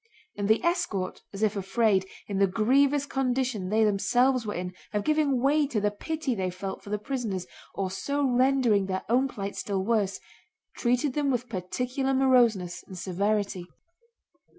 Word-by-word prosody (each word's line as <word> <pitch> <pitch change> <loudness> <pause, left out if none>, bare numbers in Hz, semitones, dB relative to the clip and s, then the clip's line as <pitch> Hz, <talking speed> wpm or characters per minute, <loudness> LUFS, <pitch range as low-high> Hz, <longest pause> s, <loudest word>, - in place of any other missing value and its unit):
And 205 -1 -2
the 220 +1 +3
escort, 340 - -1
as 200 +2 -4
if 215 0 +2
afraid, 195 0 +1 0.2
in 195 -1 -2
the 195 - +5
grievous 270 +8 +3
condition 255 -7 -1
they 220 +2 +3
themselves 245 +4 +2
were 210 - -3
in, 180 +1 -4 0.2
of 205 -1 0
giving 300 -4 +2
way 290 +1 +3
to 245 -6 -1
the 210 0 +1
pity 305 +5 -3
they 190 -4 -1
felt 190 +2 -6
for - - -11
the 210 - 0
prisoners 210 -5 -3 0.3
and 190 -1 -1
so 280 +9 -1
rendering 250 -5 +3
their 190 -1 -2
own 255 +3 +3
plight 200 -6 -5
still 195 -2 -2
worse, 205 -4 +1 0.6
treated 250 +3 +1
them 290 -1 0
with 250 -1 -1
particular 250 +7 -2
moroseness 240 -9 +3
and 185 - -9
severity. 195 0 -1
220 Hz, 165 wpm, -27 LUFS, 195-265 Hz, 0.6 s, the